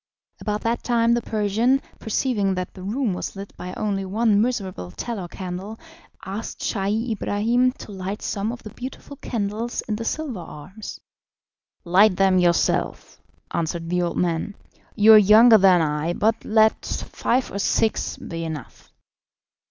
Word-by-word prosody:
About 210 0 -2
that 230 +1 -1
time 235 -1 +2
the 240 - +1
Persian, 220 +5 +1 0.2
perceiving 210 -4 0
that 180 0 -4
the 185 - -11
room 215 +3 -1
was 180 - -5
lit 195 0 -9
by 180 0 -7
only 200 -2 -1
one 210 +2 +2
miserable 195 - -2
tallow 195 - -5
candle, 185 +4 -7 0.5
asked 200 +4 -6
Scheih 215 +4 -1
Ibrahim 230 +4 +1
to 215 - -11
light 195 +1 -5
some 205 +2 -2
of 245 - -9
the 215 - -9
beautiful 260 +4 -8
candles 225 -1 -3
in 215 -2 -3
the 230 - -4
silver 270 - -3
arms. 175 +6 -9 0.8
"Light 185 +3 +5
them 190 -1 +4
yourself," 175 -1 0 0.3
answered 165 0 -2
the 180 0 +1
old 175 -1 -2
man; 175 +3 -1 0.4
"you 220 0 +7
are 215 - +10
younger 220 +3 +7
than 185 -3 +5
I, 150 +2 -1
but 220 +4 0
let 220 0 +3
five 255 +2 -2
or 200 - -4
six 220 +2 0
be 165 0 -6
enough." 155 -6 -8
205 Hz, 150 wpm, -23 LUFS, 185-225 Hz, 0.8 s, are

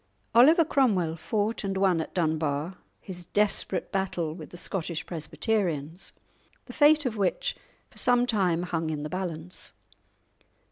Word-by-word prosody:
Oliver 310 +8 +7
Cromwell 200 - +2
fought 210 +7 -1
and 195 -1 -2
won 190 -4 +3
at - - -8
Dunbar 155 0 -1 0.2
his 180 -2 -9
desperate 210 0 0
battle 180 -5 -1
with 160 -2 -9
the 175 - -9
Scottish 170 -2 -3
Presbyterians, 170 -2 -2 0.5
the - - -10
fate 300 0 +5
of 230 -3 -2
which 195 -3 0 0.4
for - - -6
some 245 -1 +4
time 185 -8 +1
hung 165 -3 -2
in 150 -2 -3
the 150 - -4
balance. 180 -1 -4
180 Hz, 140 wpm, -27 LUFS, 160-210 Hz, 0.5 s, Oliver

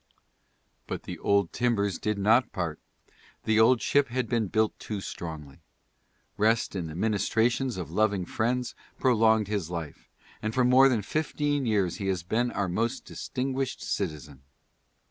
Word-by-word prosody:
But - - -5
the - - -7
old 100 -3 +1
timbers 100 -6 0
did 105 0 -1
not 110 +5 +3
part. 85 -4 -3 0.6
The 110 0 +2
old 115 +2 +5
ship 145 -1 +3
had 125 0 -2
been 115 -3 0
built 110 +3 0
too 105 -2 -5
strongly. 80 -7 -7 0.8
Rest 115 +2 +2
and 90 -5 -4
the 75 - -8
ministrations 110 +5 +1
of 85 -3 -5
loving 100 -1 +1
friends 125 +6 -1 0.2
prolonged 110 -4 +3
his 100 -6 -2
life, 85 -4 -7 0.3
and 110 0 -3
for 130 - +3
more 130 +2 +6
than 115 -5 0
fifteen 145 0 -1
years 100 -6 +1
he 100 - -4
has 95 -3 -1
been 115 +7 0
our 100 -4 -2
most 115 +7 -2
distinguished 130 0 -3
citizen. 75 -7 -4
110 Hz, 150 wpm, -28 LUFS, 95-120 Hz, 0.8 s, more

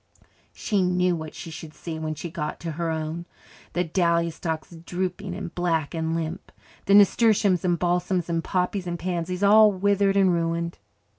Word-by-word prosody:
She 205 -3 -1
knew 180 0 +2
what 160 -2 -7
she 165 - -8
should 155 0 -9
see 160 -2 -6
when 155 -1 -3
she 165 +2 -6
got 150 - -4
to 165 - -4
her 165 +2 -2
own 160 +2 -3 0.5
the 175 - +1
dahlia 170 -1 +1
stalks 160 -1 -4
drooping 180 +3 -4
and 175 - -6
black 165 -4 -1
and 160 0 -1
limp, 165 +3 -4 0.3
the 200 - +5
nasturtiums 205 -3 +4
and 175 -2 +2
balsams 180 0 0
and 165 -1 -1
poppies 180 0 -1
and 175 0 -2
pansies 180 +1 -3
all 210 +1 +7
withered 200 0 +2
and 190 -2 +4
ruined. 170 0 -1
175 Hz, 170 wpm, -25 LUFS, 165-185 Hz, 0.5 s, all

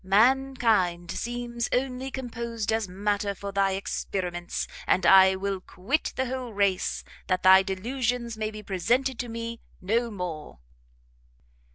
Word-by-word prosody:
Mankind 220 -5 +3
seems 240 0 -3
only 260 +1 -1
composed 235 -4 -3
as 220 -2 0
matter 200 +2 -1
for 200 +1 -6
thy 195 0 +2
experiments, 180 -2 -3 0.2
and 185 - +2
I 190 0 +7
will 195 0 -3
quit 215 +13 -2
the 260 - 0
whole 250 -2 -4
race, 200 -2 +1 0.2
that 185 0 0
thy 190 +1 +8
delusions 235 +4 -2
may 215 0 -2
be 215 -1 -9
presented 240 +7 0
to 245 - -3
me 230 0 -5 0.2
no 230 +5 0
more!" 175 - -6
215 Hz, 135 wpm, -27 LUFS, 190-240 Hz, 0.2 s, thy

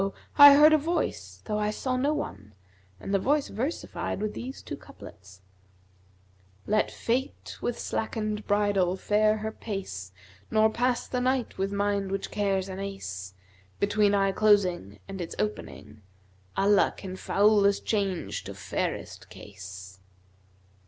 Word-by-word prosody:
I 285 -1 +11
heard 305 +2 +7
a 310 - +5
Voice 335 +4 -3
though 210 -1 -1
I 210 0 0
saw 255 +4 -2
no 275 +4 +1
one 105 - -5 0.4
and 195 - -5
the 195 - +3
Voice 285 +7 +1
versified 250 - -3
with 210 0 -2
these 260 +3 -7
two - - -6
couplets, 95 0 -14 1.2
'Let 215 +1 +1
Fate 255 +3 -3
with 240 - -2
slackened 215 -1 -3
bridle 200 -3 +2
fare 215 +2 +2
her 215 +1 -4
pace, 185 - -6 0.2
* 95 +1 -27
Nor 220 0 +3
pass 245 +2 0
the 250 - -2
night 255 -3 -1
with 195 +1 0
mind 200 -1 -1
which 195 0 -3
cares 195 -2 0
an 190 0 -6
ace 95 - -6 0.4
Between 205 0 +3
eye 195 -1 +2
closing 185 - +2
and 195 -2 -6
its 165 - -6
opening, 105 +1 -5 0.3
* 95 0 -26
Allah 200 0 +3
can 185 -2 -7
foulest 200 +1 +3
change 200 -5 -1
to - - -7
fairest - - -4
case.' 95 -1 -11
200 Hz, 145 wpm, -27 LUFS, 180-220 Hz, 1.2 s, I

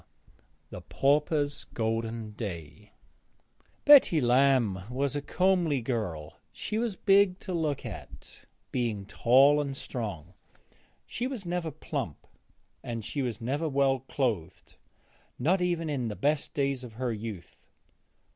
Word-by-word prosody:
X - - -31 0.6
THE - - -7
PAUPERS' 145 +1 +1
GOLDEN 115 -1 -2
DAY 90 -9 -7 0.9
Betty 280 - +8
Lamb 125 -5 +3
was 140 +3 -1
a 145 - -1
comely 180 -3 +2
girl; 105 - -4
she 215 - -3
was 230 -4 -1
big 195 -2 +4
to 185 - -5
look 155 -5 -1
at, - - -10 0.3
being 115 -6 -1
tall 135 +7 +5
and 140 -2 -4
strong. 105 - -6 0.7
She 245 - -3
was 250 -8 -5
never 175 -1 -2
plump; 140 - -5 0.8
she 140 +7 -3
was 120 -6 -3
never 145 +7 -1
well 135 -1 +2
clothed, 115 - -3 0.6
not 175 +9 +2
even 175 -2 0
in 135 -6 -1
the 105 - -4
best 145 +4 -1
days 140 -2 0
of 120 -3 -9
her 120 +1 -2
youth. 105 -5 -7
135 Hz, 125 wpm, -29 LUFS, 115-155 Hz, 0.9 s, Betty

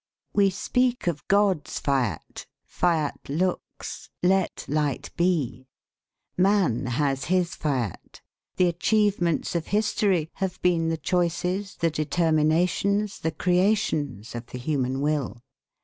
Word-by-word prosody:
We 200 -1 +4
speak 250 +6 0
of 170 -4 -2
God's 200 -5 +2
fiat 125 - -2 0.2
"Fiat 160 -4 0
lux, 180 +6 -3
Let 190 0 +1
light 145 -2 -1
be." 150 -8 0 0.7
Man 180 - +2
has 135 +2 0
his 180 0 +1
fiat. 130 - -3 0.4
The 180 - +4
achievements 175 -1 +1
of 170 -2 -2
history 200 -5 +1
have 190 -2 -2
been 170 -2 +2
the 165 - -1
choices, 180 +3 -1
the 165 -1 0
determinations, 165 +6 +1
the 160 - -1
creations, 175 - 0
of 120 0 -6
the - - -7
human 130 -1 -1
will. 145 -5 -1
170 Hz, 115 wpm, -25 LUFS, 145-185 Hz, 0.7 s, We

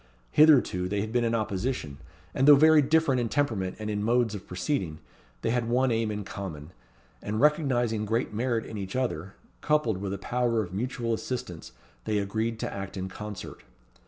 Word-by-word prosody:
Hitherto 140 -12 +5
they 100 0 0
had 110 +1 -4
been 120 -1 +2
in 115 0 +1
opposition, 100 - -2 0.3
and 135 - +2
though 145 - +10
very 155 +2 +6
different 145 -3 +2
in 115 - -2
temperament 110 -11 -1
and 110 - -5
in 105 -1 -2
modes 120 0 +2
of 100 -3 -8
proceeding, 90 - -2 0.5
they 115 - +1
had 120 -1 0
one 125 +1 +2
aim 115 -1 0
in 105 -1 -3
common; 90 -6 -7 0.5
and 105 +1 -3
recognizing 125 -7 +2
great 115 +1 -1
merit 115 0 -1
in 110 - -6
each 95 +1 -6
other, 100 -8 -2 0.3
coupled 150 -9 +1
with 100 -1 -3
a 100 - -3
power 120 +1 0
of 90 -2 -9
mutual 115 +2 -2
assistance, 110 -8 -5 0.3
they 105 - 0
agreed 110 +3 -1
to - - -3
act 95 0 -6
in 95 0 -4
concert. 105 -1 -8
115 Hz, 185 wpm, -27 LUFS, 100-125 Hz, 0.5 s, though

